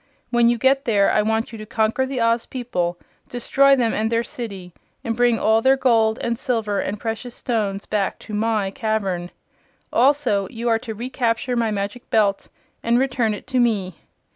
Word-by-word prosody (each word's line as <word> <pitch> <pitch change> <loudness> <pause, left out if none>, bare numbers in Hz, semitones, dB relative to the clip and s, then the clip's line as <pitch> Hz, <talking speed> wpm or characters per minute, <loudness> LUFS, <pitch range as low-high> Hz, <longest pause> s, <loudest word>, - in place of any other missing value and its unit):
When 240 -1 +4
you 240 - +1
get 270 +4 +2
there 205 -4 +3
I 215 - +3
want 220 +2 -1
you 225 - -9
to 215 - -7
conquer 225 +3 0
the 265 -1 -3
Oz 230 0 +1
people, 180 -9 -2 0.3
destroy 275 +3 +3
them 240 -4 +1
and 220 +1 -1
their 230 0 +1
city, 195 -8 -7 0.3
and 230 -1 -2
bring 240 -1 +3
all 220 +1 +3
their 265 +3 +4
gold 225 -4 +3
and 235 0 -1
silver 220 -7 -1
and 205 +2 -3
precious 230 +2 -5
stones 210 -5 -2
back 205 -2 -1
to 215 - -8
my 210 -2 0
cavern. 200 -7 -2 0.6
Also 250 -7 +2
you 230 +1 -5
are 225 -1 +2
to 225 -2 -7
recapture 245 +1 -1
my 230 -2 +1
Magic 205 +3 -4
Belt 205 -3 +1 0.3
and 235 +1 +2
return 250 -4 +1
it - - -11
to 255 0 -1
me. 205 -7 +1
225 Hz, 185 wpm, -22 LUFS, 210-245 Hz, 0.6 s, When